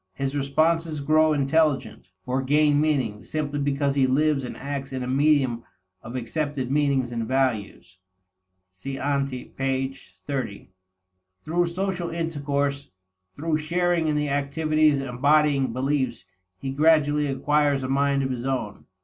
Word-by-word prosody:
His 135 +1 -2
responses 155 +3 +1
grow 155 +2 +3
intelligent, 140 -8 +1 0.2
or 130 +1 0
gain 145 +2 +3
meaning, 130 -9 0
simply 145 -2 -3
because 140 0 0
he 135 -2 +3
lives 145 +1 +2
and 125 - -6
acts 140 0 -5
in 130 -1 -3
a - - -4
medium 135 -3 +2 0.4
of 120 +2 -9
accepted 130 +2 -3
meanings 140 -4 +1
and 115 -2 -3
values. 110 -8 -2 0.7
(See 135 +9 -7
ante, 140 -2 -2
p. 135 0 -1 0.3
30.) 130 -9 -4 0.7
Through 175 +3 +1
social 180 0 -2
intercourse, 145 -4 -2 0.5
through 155 +1 -1
sharing 170 +1 0
in 150 - +1
the 150 0 0
activities 150 +1 +2
embodying 135 +1 +2
beliefs, 130 -3 -1 0.3
he 135 +7 -4
gradually 150 0 +3
acquires 145 0 +1
a - - -2
mind 140 +1 +1
of 130 - -1
his 120 -2 -4
own. 120 -6 -3
140 Hz, 135 wpm, -25 LUFS, 130-150 Hz, 0.7 s, grow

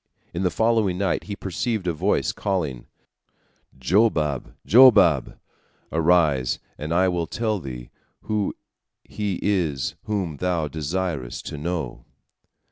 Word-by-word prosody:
In 85 - -3
the 90 - +2
following 110 -1 +1
night 95 -2 -1
he 100 - -5
perceived 100 +2 -3
a 85 - 0
voice 75 - +1
calling: 80 -11 -3 0.9
"Jobab! 75 - +1
Jobab! 105 - +6 0.5
Arise, 80 -6 +2 0.2
and 75 +2 -6
I 90 +2 +3
will 85 -2 -1
tell 110 -3 -1
thee 60 -6 -8 0.3
who 105 -2 -1 0.5
he 100 -4 -3
is 85 -10 0
whom 95 -8 -2
thou 85 -3 0
desirest 75 -3 -3
to - - -6
know. 80 -4 -4
90 Hz, 120 wpm, -24 LUFS, 75-100 Hz, 0.9 s, Jobab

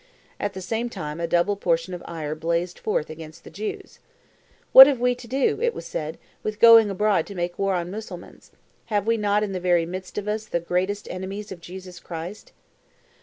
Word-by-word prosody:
At 205 -1 -2
the 190 - -7
same 225 +5 -2
time 155 -7 -6
a 170 - -1
double 175 +5 +2
portion 170 -1 0
of 175 - -6
ire 155 -3 -4
blazed 170 +3 -2
forth 205 -8 -1
against 155 0 -10
the - - -12
Jews. 210 +6 -6 0.7
"What 265 +1 +13
have 275 -4 +1
we 250 0 +2
to 245 -1 -11
do," 275 - 0
it 475 0 +1
was - - -7
said, - - -4 0.2
"with 215 0 -4
going 230 -2 +8
abroad 200 -3 +1
to 200 - -9
make 175 0 -3
war 195 -1 +1
on 175 0 -3
Mussulmans? 195 -4 -9 0.4
Have 205 -3 -1
we 230 +1 +2
not 210 -1 +1
in 205 - -3
the 185 - -3
very 175 -2 +2
midst 185 +2 -7
of 210 0 -3
us 215 +1 -2
the 170 - -1
greatest 185 +4 -2
enemies 195 +3 -6
of 180 -3 -8
Jesus 180 +1 -10
Christ?" 175 +4 -8
190 Hz, 205 wpm, -24 LUFS, 175-215 Hz, 0.7 s, What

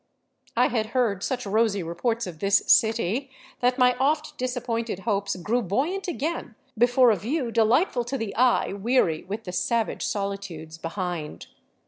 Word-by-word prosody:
I - - +4
had 225 -3 -1
heard 210 -6 +1
such 250 +1 -2
rosy 205 -1 +1
reports 225 +8 -2
of 170 -4 -8
this 200 +2 +4
" - - -4
city 225 +4 -2 0.2
" - - -25
that 250 +1 +2
my 250 -1 +4
oft 300 +3 0
disappointed 240 -5 -3
hopes 200 -2 -1
grew 215 +7 0
buoyant 285 - -1
again 325 -7 -3 0.2
before 245 +1 +5
a - - +3
view 240 - -2
delightful 240 - +2
to 270 +3 -3
the 225 -5 -4
eye 245 -4 +3
weary 200 -6 +1
with 210 +4 -5
the 180 - -6
savage 225 +5 -1
solitudes 195 -6 -4
behind. 170 -2 -4
225 Hz, 160 wpm, -25 LUFS, 195-250 Hz, 0.2 s, before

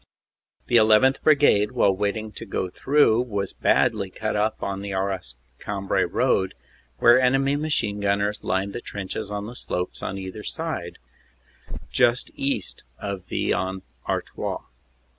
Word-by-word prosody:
The 120 - +5
1 110 - +5
1th. 130 +2 +2
Brigade, 140 -9 +4
while 100 -1 +3
waiting 105 +2 -2
to 115 - -8
go 95 -2 -2
through, 135 -3 +3
was 100 -6 -3
badly 105 -5 +2
cut 110 +3 -3
up 105 +1 0
on 100 0 -3
the 100 0 -5
Arras 95 -10 -2 0.2
Cambrai 100 -1 -1
road, 95 -1 +1 0.4
where 120 +2 +6
enemy 135 +2 +3
machine 145 -9 0
gun 100 0 +2
ners 105 +1 -2
lined 95 +2 -1
the 120 - -5
trenches 100 +1 -5
on 105 0 -4
the 120 +3 -8
slopes 90 -6 -4
on 95 - -3
either 95 +2 -6 0.2
hand, 120 - -4 0.9
just 120 0 +2
east 135 -9 -2
of 100 -3 -5
Vis - - 0
en 95 +1 -2 0.3
Artois. - - -3
105 Hz, 150 wpm, -24 LUFS, 95-120 Hz, 0.9 s, where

